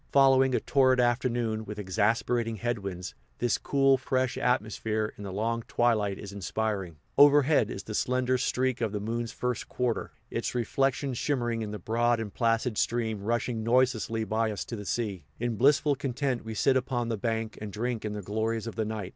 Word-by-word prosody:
Following 135 -1 +5
a - - +2
torrid 130 -2 +3
afternoon, 120 -2 +1
with 105 -1 -7
exasperating 110 +4 0
headwinds, 100 -6 -4 0.2
this 120 -1 +1
cool, 135 -1 +3
fresh 130 -1 0
atmosphere, 110 -3 0
in 105 - -9
the 100 - -5
long 115 +4 -1
twilight, 110 -5 +1
is 100 -1 -8
inspiring. 100 -3 -3 0.2
Overhead 145 -4 +6
is 100 - -5
the 110 - -7
slender 125 +2 +1
streak 130 -1 0
of 110 -3 -1
the 105 - -1
moon's 115 +2 -3
first 125 -1 -3
quarter, 125 -3 -1 0.2
its - - -2
reflection 135 +3 0
shimmering 120 -3 -1
in 110 - -3
the 105 - -5
broad 115 +4 +1
and 110 -3 -5
placid 115 -1 +1
stream 110 -3 0
rushing 115 +2 -1
noiselessly 115 -2 +2
by 110 +2 0
us 105 - -4
to 115 - -5
the 105 -2 -7
sea. 100 -6 -2
In 120 -1 -1
blissful 140 +5 +4
content 130 -1 -2
we 110 0 -6
sit 130 +5 +3
upon 125 -2 0
the 115 - 0
bank, 110 0 -2
and 105 -1 -5
drink 115 +2 -2
in 105 -1 -3
the 105 -1 -5
glories 110 +3 -1
of 115 - -5
the 110 0 -1
night. 105 -3 -4
115 Hz, 185 wpm, -28 LUFS, 110-125 Hz, 0.2 s, Overhead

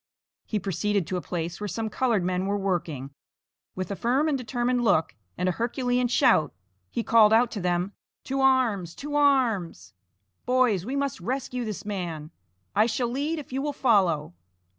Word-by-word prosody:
He 215 - -1
proceeded 200 0 -1
to 185 - -3
a - - -3
place 170 +1 -4
where 210 - -2
some 225 +3 -3
colored 225 -4 +1
men 180 +1 -1
were 200 +1 0
working. 170 -8 -2 0.6
With 185 +1 -4
a - - -2
firm 260 +9 +1
and 300 - +1
determined 245 0 -1
look, 175 -8 +2 0.2
and 180 - 0
a - - +3
herculean 245 +4 0
shout, 235 - +3 0.3
he 230 - -2
called 220 -2 +5
out 235 +1 +4
to 205 - -4
them, 180 +2 0 0.3
"To 270 0 -2
arms, 235 -10 +2
to 290 +1 -6
arms! 225 - +1 0.5
boys, 245 -7 +2
we 265 - -2
must 280 -5 -1
rescue 250 +3 -3
this 215 -2 -5
man; 170 -6 -4 0.4
I 215 +2 +4
shall 235 +1 -1
lead 290 +6 -2
if 290 -4 -8
you 265 - -1
will 290 0 -2
follow." 185 - +2
220 Hz, 175 wpm, -26 LUFS, 180-255 Hz, 0.6 s, called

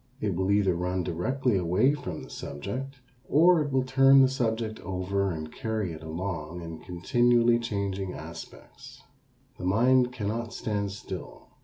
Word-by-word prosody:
It 105 -3 -1
will 95 +2 -1
either 100 -2 +3
run 90 +1 -1
directly 120 +8 0
away 90 +10 +3
from 90 - -6
the - - -11
subject 125 - -6 0.3
or 170 +3 +5
it 145 -1 -2
will 130 -1 +2
turn 135 +1 +6
the - - +6
subject 115 -4 -2
over 95 +1 -1
and 80 -3 -5
carry 110 -7 -2
it 80 - -9
along 85 0 -5
in 80 -1 -7
continually 120 +5 +2
changing 100 -4 -3
aspects. 80 +2 -11 0.6
The 90 - -5
mind 125 +6 +4
cannot 115 0 -3
stand 100 -2 -2
still. 95 -2 -8
100 Hz, 150 wpm, -28 LUFS, 90-125 Hz, 0.6 s, turn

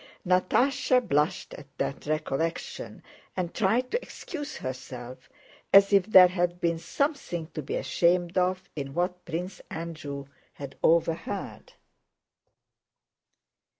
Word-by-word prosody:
Natásha 250 +9 +3
blushed 150 +6 0
at 140 - -10
that 140 - -3
recollection 155 +1 -3 0.3
and 175 -2 -2
tried 230 +5 +1
to 475 - 0
excuse 295 -4 -7
herself, 130 -1 -7 0.4
as 200 +1 +7
if 195 -1 +5
there 185 -4 +9
had 175 -1 -1
been 170 -1 0
something 275 - -2
to 155 - -4
be 135 - -4
ashamed 170 +6 +1
of 185 +1 +1
in 140 -2 -5
what 180 +1 -1
Prince 180 +3 -5
Andrew 155 -4 -6 0.3
had 140 -1 -8
overheard. 170 +4 0
175 Hz, 115 wpm, -27 LUFS, 155-190 Hz, 0.4 s, there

